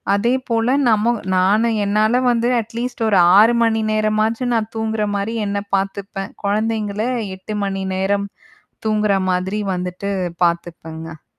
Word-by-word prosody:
அதேபோல 235 Hz, +1 st, 0 dB, 0.2 s
நம்ம 220 Hz, +1 st, +3 dB, 0.3 s
நானும் 215 Hz, +5 st, +3 dB
என்னால 215 Hz, +5 st, +2 dB
வந்து 235 Hz, 0 st, +1 dB
அட்லீஸ்ட் 230 Hz, +1 st, -5 dB
ஒரு 200 Hz, -3 st, +3 dB, 0.2 s
6:00 230 Hz, +3 st, +6 dB
மணி 225 Hz, -1 st, +2 dB
நேரமாச்சும் 215 Hz, +3 st, 0 dB
நான் 220 Hz, -1 st, -1 dB
தூங்குறமாரி 215 Hz, -1 st, -1 dB
என்னை 200 Hz, 0 st, -2 dB, 0.2 s
பார்த்துப்பேன். 195 Hz, 0 st, -4 dB
குழந்தைங்கள 210 Hz, 0 st, -1 dB, 0.4 s
8:00 210 Hz, +3 st, -6 dB
மணி 195 Hz, -1 st, -3 dB
நேரம் 200 Hz, +1 st, 0 dB, 0.6 s
தூங்குற 210 Hz, -2 st, +2 dB, 0.2 s
மாதிரி 190 Hz, +3 st, -1 dB, 0.2 s
வந்துட்டு 180 Hz, +2 st, -4 dB, 0.3 s
பார்த்துப்பேங்க. 165 Hz, -2 st, -4 dB
210 Hz, 115 wpm, -19 LUFS, 195-225 Hz, 0.6 s, 6:00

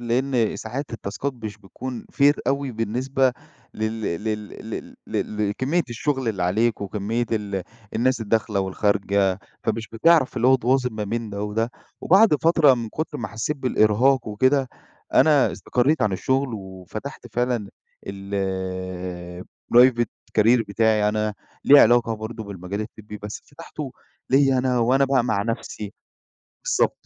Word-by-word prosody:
لإن 120 Hz, 0 st, 0 dB
ساعات 130 Hz, +6 st, -5 dB
التاسكات 115 Hz, +6 st, -4 dB
مش 110 Hz, -3 st, -7 dB
بتكون 120 Hz, +5 st, -7 dB
fair 145 Hz, +1 st, +5 dB
أوي 140 Hz, 0 st, 0 dB
بالنسبة 125 Hz, +4 st, 0 dB, 0.4 s
لل 110 Hz, +1 st, -2 dB
لل 105 Hz, +3 st, -3 dB, 0.2 s
لل -, -, -7 dB
ل 105 Hz, -1 st, -2 dB
لكمية 140 Hz, +11 st, 0 dB
الشغل 130 Hz, +1 st, -1 dB
اللي 95 Hz, -5 st, -2 dB
عليك 110 Hz, +6 st, +1 dB
وكمية 105 Hz, +4 st, -2 dB
ال 100 Hz, -3 st, -2 dB, 0.3 s
الناس 125 Hz, +1 st, +1 dB
الداخلة 105 Hz, -2 st, 0 dB
والخارجة، 100 Hz, 0 st, +1 dB, 0.3 s
فمش 110 Hz, 0 st, -2 dB
بتعرف 135 Hz, +2 st, +3 dB
اللي 120 Hz, +1 st, +2 dB
هو 130 Hz, -, +7 dB
تواظِب 125 Hz, -1 st, +1 dB
ما 105 Hz, -1 st, -3 dB
بين 115 Hz, +1 st, -3 dB
ده 100 Hz, +1 st, -4 dB
وده، 115 Hz, +3 st, -1 dB, 0.3 s
وبعد 195 Hz, -1 st, +5 dB
فترة 160 Hz, -5 st, +5 dB
من 115 Hz, -2 st, -4 dB
كتر 155 Hz, +3 st, -4 dB
ما 115 Hz, -, -4 dB
حسّيت 120 Hz, +6 st, -3 dB
بالإرهاق 125 Hz, 0 st, +2 dB
وكده، 130 Hz, +5 st, +2 dB, 0.5 s
أنا 150 Hz, -3 st, +5 dB
استقرّيت 135 Hz, +6 st, +1 dB
عن 105 Hz, -2 st, +2 dB
الشغل 130 Hz, +7 st, 0 dB
وفتحت 95 Hz, +7 st, -8 dB
فعلًا 120 Hz, -4 st, 0 dB, 0.4 s
الprivate 95 Hz, +4 st, 0 dB, 0.3 s
career 115 Hz, +2 st, +5 dB
بتاعي 105 Hz, 0 st, +2 dB
أنا 105 Hz, 0 st, -1 dB, 0.3 s
ليه 145 Hz, 0 st, +9 dB
علاقة 115 Hz, 0 st, +4 dB
برضه 110 Hz, +1 st, -6 dB
بالمجال 100 Hz, +1 st, -5 dB
الطبي 105 Hz, -1 st, -8 dB
بس 105 Hz, 0 st, -6 dB
فتحته 145 Hz, -2 st, -8 dB, 0.4 s
ليَّ 135 Hz, -1 st, +4 dB
أنا 125 Hz, -1 st, +1 dB
وأنا 130 Hz, +4 st, +3 dB
بقى 130 Hz, -3 st, +2 dB
مع 105 Hz, -4 st, 0 dB
نفسي 105 Hz, -2 st, -4 dB, 0.7 s
بالضبط. -, -, 0 dB
115 Hz, 140 wpm, -23 LUFS, 105-130 Hz, 0.7 s, ليه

